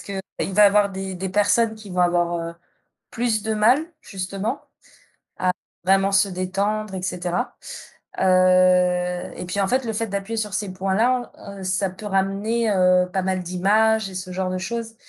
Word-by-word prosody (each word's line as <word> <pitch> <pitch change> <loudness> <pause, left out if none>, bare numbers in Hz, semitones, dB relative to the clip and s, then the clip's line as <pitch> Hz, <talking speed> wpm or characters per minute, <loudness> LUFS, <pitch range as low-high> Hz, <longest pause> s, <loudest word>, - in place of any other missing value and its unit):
qu'il 195 -1 -5 0.3
va 210 +2 +6
avoir 205 0 +4
des 190 0 -5
des 190 +1 -4
personnes 215 +3 +2
qui 215 -2 -12
vont 180 0 -1
avoir, 175 -1 +2
heu, 170 - -13 0.6
plus 225 -3 0
de 220 0 -1
mal 225 +6 +4 0.2
justement 195 +5 -4 0.8
à 185 - +1 0.3
vraiment 195 +1 +3
se 195 +1 +4
détendre 195 +3 -2
et 185 - -4
cetera. 180 -1 -3 0.6
Heu 185 -1 +3
et 180 - -6
puis 190 +3 -2
en 195 - +1
fait 255 +2 0
le 225 - -2
fait 225 +1 -2
d'appuyer 200 +3 -4
sur 210 -3 -3
ces 205 -2 -2
points-là, 220 +7 0 0.3
heu, - - -7
ça 185 +1 0
peut 185 +3 -11
ramener, 205 +4 0
heu, 180 -1 +3
pas 190 - 0
mal 185 -1 -1
d'images 210 +4 +2
et 190 - -10
ce 185 0 -6
genre 185 0 -2
de 185 - -2
choses. 225 +3 -5
195 Hz, 175 wpm, -22 LUFS, 185-215 Hz, 0.8 s, va